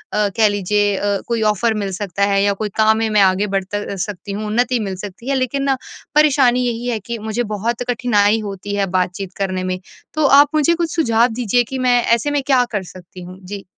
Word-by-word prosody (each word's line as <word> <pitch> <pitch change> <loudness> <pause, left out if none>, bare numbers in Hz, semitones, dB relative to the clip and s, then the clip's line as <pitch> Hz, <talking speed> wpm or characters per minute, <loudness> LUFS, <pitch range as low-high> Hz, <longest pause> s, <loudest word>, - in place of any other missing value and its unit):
कह 210 +1 +2
लीजिए 205 0 +1
अ, 205 0 0
कोई 235 -1 -1
ऑफ़र 225 +2 0
मिल 195 - -3
सकता 200 0 -3
है 195 0 +3
या 200 0 +2
कोई 210 +1 -4
काम 220 0 +3
है, 225 - 0
मैं 210 -1 +3
आगे 190 +2 +3
बढ़ 195 -1 -1
त 190 +2 -7
अ, 205 -1 -4
सकती 200 +1 -5
हूँ, 210 +2 -4
उन्नति 245 +3 +1
मिल 195 -3 -3
सकती 205 +6 -8
है। 275 - +1
लेकिन 265 +1 -1
ना 270 -1 +1 0.4
परेशानी 275 -5 +4
यही 240 +1 -3
है 235 -3 -1
कि 235 +3 -6
मुझे 220 +2 -2
बहुत 215 +1 -2 0.2
कठिनाई 220 -3 +2
होती 205 -1 -5
है 200 -1 +1
बातचीत 185 +1 -2
करने 185 -2 -2
में। 185 0 -3 0.3
तो 310 0 +1
आप 280 +1 +7
मुझे 310 +2 +3
कुछ 335 -1 -2
सुझाव 235 -7 +3
दीजिए 245 +1 +1
कि 265 - -2
मैं 250 -1 +3
ऐसे 235 +5 +1
में 290 -1 +1
क्या 265 -3 +4
कर 205 -4 -2
सकती 180 0 -12
हूँ? 180 +1 -10
जी। 200 +1 -7
215 Hz, 225 wpm, -18 LUFS, 200-245 Hz, 0.4 s, आप